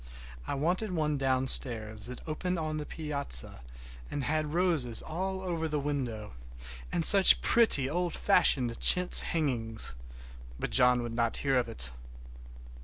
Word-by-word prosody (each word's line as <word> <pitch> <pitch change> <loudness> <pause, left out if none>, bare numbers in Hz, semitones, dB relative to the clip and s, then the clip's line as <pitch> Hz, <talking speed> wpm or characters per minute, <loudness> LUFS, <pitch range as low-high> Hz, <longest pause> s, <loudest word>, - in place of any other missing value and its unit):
I - - -4
wanted 180 +9 -3
one 150 -4 -3
downstairs 120 -5 +2
that 125 +5 -11
opened 180 +4 -5
on 155 -1 -5
the 150 - -7
piazza 140 - -4 0.5
and 145 - -6
had 155 +2 -4
roses 160 -10 -1
all 190 +3 -6
over 170 -3 -5
the 150 -1 -4
window, 130 -7 -6 0.6
and 165 - 0
such 195 -2 +9
pretty 220 - +4
old 175 +3 -4
fashioned 120 -4 0
chintz 180 0 +4
hangings! 120 - -4 0.7
but - - -5
John 125 -1 +2
would 120 -1 -7
not 115 -1 -2
hear 135 -1 0
of 125 -1 -2
it. - - -6
145 Hz, 140 wpm, -27 LUFS, 125-165 Hz, 0.7 s, such